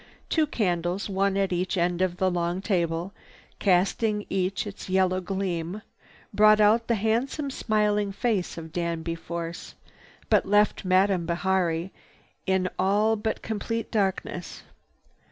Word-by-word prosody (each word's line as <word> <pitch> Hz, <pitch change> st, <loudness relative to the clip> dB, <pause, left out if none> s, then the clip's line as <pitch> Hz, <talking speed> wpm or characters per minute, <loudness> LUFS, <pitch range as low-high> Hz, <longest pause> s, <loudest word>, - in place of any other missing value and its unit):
Two 315 Hz, -2 st, +2 dB
candles, 180 Hz, -, -1 dB
one 195 Hz, 0 st, +1 dB
at 195 Hz, -2 st, +1 dB
each 180 Hz, +2 st, -1 dB
end 175 Hz, +1 st, +1 dB
of 180 Hz, -1 st, 0 dB
the 190 Hz, 0 st, +1 dB
long 175 Hz, +1 st, -1 dB
table, 175 Hz, -2 st, -1 dB, 0.5 s
casting 205 Hz, +3 st, +2 dB
each 190 Hz, +1 st, -1 dB
its 200 Hz, -2 st, -8 dB
yellow 185 Hz, 0 st, +2 dB
gleam, 185 Hz, 0 st, -3 dB, 0.5 s
brought 215 Hz, +1 st, +6 dB
out 220 Hz, +2 st, +4 dB
the 235 Hz, -, +2 dB
handsome 235 Hz, +7 st, -1 dB
smiling 210 Hz, -4 st, +1 dB
face 200 Hz, -4 st, -1 dB
of 160 Hz, -1 st, -8 dB
Danby 170 Hz, -1 st, -2 dB
Force, 170 Hz, 0 st, -6 dB, 0.5 s
but -, -, +3 dB
left 205 Hz, +2 st, +3 dB
Madame 185 Hz, -2 st, +2 dB
Bihari 175 Hz, 0 st, 0 dB, 0.6 s
in 190 Hz, -1 st, +2 dB
all 205 Hz, +4 st, +3 dB
but 220 Hz, +1 st, -3 dB
complete 225 Hz, +1 st, -3 dB
darkness. 195 Hz, -4 st, -2 dB
190 Hz, 130 wpm, -26 LUFS, 175-210 Hz, 0.6 s, brought